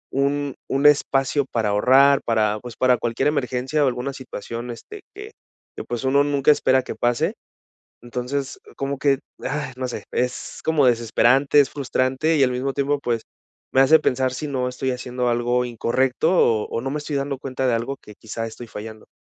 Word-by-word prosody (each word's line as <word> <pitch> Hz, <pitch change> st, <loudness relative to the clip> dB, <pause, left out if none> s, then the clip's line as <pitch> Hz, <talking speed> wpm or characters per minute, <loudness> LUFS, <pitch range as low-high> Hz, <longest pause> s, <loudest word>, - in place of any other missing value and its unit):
un 140 Hz, 0 st, 0 dB, 0.2 s
un 135 Hz, +2 st, 0 dB
espacio 140 Hz, -1 st, +3 dB
para 110 Hz, -3 st, 0 dB
ahorrar 135 Hz, +7 st, +5 dB
para, 110 Hz, -2 st, +1 dB
pues, 120 Hz, -2 st, -9 dB
para 130 Hz, -1 st, +3 dB
cualquier 120 Hz, +4 st, 0 dB
emergencia 135 Hz, +1 st, 0 dB
o -, -, +3 dB
alguna 125 Hz, +2 st, -2 dB
situación, 120 Hz, -2 st, -7 dB
este, 415 Hz, -, -10 dB
que 420 Hz, +2 st, -9 dB, 0.4 s
que, -, -, -6 dB
pues, 120 Hz, +2 st, -5 dB
uno 140 Hz, +2 st, +3 dB
nunca 145 Hz, 0 st, +3 dB
espera 130 Hz, -2 st, +3 dB
que -, -, -6 dB
pase. 120 Hz, 0 st, 0 dB, 0.7 s
Entonces, 125 Hz, +3 st, -4 dB
oh, -, -, -19 dB
como 140 Hz, 0 st, -2 dB
que, 135 Hz, -1 st, +2 dB, 0.2 s
ah, 145 Hz, -1 st, -3 dB
no 130 Hz, 0 st, -3 dB
sé, -, -, -6 dB
es 125 Hz, 0 st, -3 dB
como 155 Hz, -3 st, +2 dB
desesperante, 125 Hz, +4 st, +3 dB
es 140 Hz, -, +4 dB
frustrante 135 Hz, +3 st, 0 dB
y 140 Hz, -, +4 dB
al 125 Hz, -, +2 dB
mismo 130 Hz, +2 st, -2 dB
tiempo, 140 Hz, +1 st, 0 dB
pues, 115 Hz, -2 st, -1 dB, 0.5 s
me 135 Hz, -, +5 dB
hace 155 Hz, +4 st, +6 dB
pensar 130 Hz, -3 st, 0 dB
si 150 Hz, +4 st, -4 dB
no 130 Hz, -3 st, -1 dB
estoy 130 Hz, +1 st, -2 dB
haciendo 125 Hz, 0 st, -3 dB
algo 120 Hz, +1 st, +1 dB
incorrecto 125 Hz, +6 st, 0 dB
o 115 Hz, -, +3 dB
o -, -, -2 dB
no 135 Hz, -, -3 dB
me 150 Hz, -, -2 dB
estoy 145 Hz, -1 st, -3 dB
dando 140 Hz, 0 st, -2 dB
cuenta 130 Hz, -1 st, -3 dB
de 125 Hz, -, +2 dB
algo 120 Hz, +4 st, -2 dB
que 105 Hz, -, -13 dB
quizá 115 Hz, +1 st, -6 dB
estoy 115 Hz, +2 st, -10 dB
fallando. 110 Hz, 0 st, -9 dB
130 Hz, 190 wpm, -22 LUFS, 120-140 Hz, 0.7 s, hace